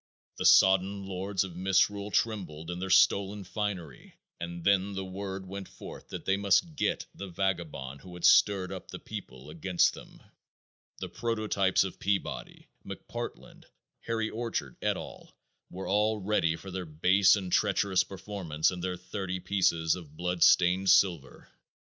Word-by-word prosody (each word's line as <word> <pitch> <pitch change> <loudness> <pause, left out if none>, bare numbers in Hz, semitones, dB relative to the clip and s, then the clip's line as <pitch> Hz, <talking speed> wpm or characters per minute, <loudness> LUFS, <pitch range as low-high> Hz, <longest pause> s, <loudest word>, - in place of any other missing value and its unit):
The - - +3
sodden 95 +1 +5
lords 95 +1 -2
of 90 -3 -8
misrule 95 +2 +1
trembled 90 -8 -2
in 90 - -5
their 95 +1 -4
stolen 100 +2 +3
finery, 95 - -5 0.2
and 85 0 -6
then 100 +1 +2
the 95 0 -4
word 95 0 -6
went 95 +1 -7
forth - - -11
that - - -8
they 95 - +2
must 100 - +2
"get" - - -1
the 100 - -7
vagabond 85 -8 -3
who 90 -1 -11
had 90 - -3
stirred 95 -3 +5
up - - -7
the - - -6
people 65 +3 -9
against 85 +2 +2
them. - - -13 0.8
The - - -3
prototypes 110 -4 +1
of 95 - -7
Peabody, 100 0 -3 0.2
McPartland, - - -8 0.3
Harry 110 -1 -2
Orchard, 110 - -4
et. - - 0
al., - - -10 0.3
were 95 +1 -7
all 105 +2 +2
ready 95 -5 +1
for 95 +3 -10
their 90 -1 -5
base 95 +6 +4
and 95 -3 -5
treacherous 100 -2 +2
performance 95 -5 -2
and 90 -1 -6
their 90 -1 -2
thirty 95 0 -5
pieces 90 -3 +1
of 75 -4 -9
blood 90 0 -2
stained 90 +2 +5
silver. 90 -6 +2
95 Hz, 155 wpm, -29 LUFS, 90-100 Hz, 0.8 s, sodden